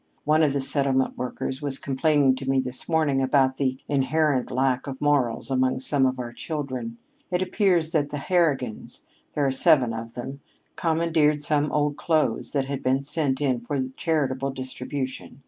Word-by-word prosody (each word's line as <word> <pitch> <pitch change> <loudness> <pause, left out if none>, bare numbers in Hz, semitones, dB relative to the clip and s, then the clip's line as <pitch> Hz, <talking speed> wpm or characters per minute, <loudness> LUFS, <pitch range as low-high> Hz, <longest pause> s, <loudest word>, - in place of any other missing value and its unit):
One 155 +1 +3
of 150 -3 +3
the 140 - 0
settlement 135 -1 +1
workers 130 +2 -4
was 140 -2 -1
complaining 140 0 +2
to 135 0 -5
me 135 0 +3
this 130 +3 -3
morning 155 -5 +2
about 130 0 +2
the 130 -2 0
inherent 145 -1 +1
lack 130 0 0
of 135 -1 -6
morals 140 -4 +1
among 130 0 +1
some 135 +1 +2
of 130 0 -2
our 120 -1 -6
children. 130 -6 -5 0.3
It 180 0 0
appears 180 -4 +1
that 150 -3 +1
the 145 - -4
Harrigans 145 - -1 0.3
there 145 - +1
are 135 - +2
seven 130 -2 +4
of 115 +1 -7
them 135 +3 -6 0.4
commandeered 160 -3 +1
some 150 0 +1
old 145 -1 0
clothes 155 -9 0
that 140 -2 +1
had 140 0 -4
been 130 +1 +1
sent 145 -2 0
in 130 -4 +1
for 140 +4 -3 0.2
charitable 135 -4 -1
distribution. 130 0 -6
135 Hz, 170 wpm, -25 LUFS, 130-150 Hz, 0.4 s, seven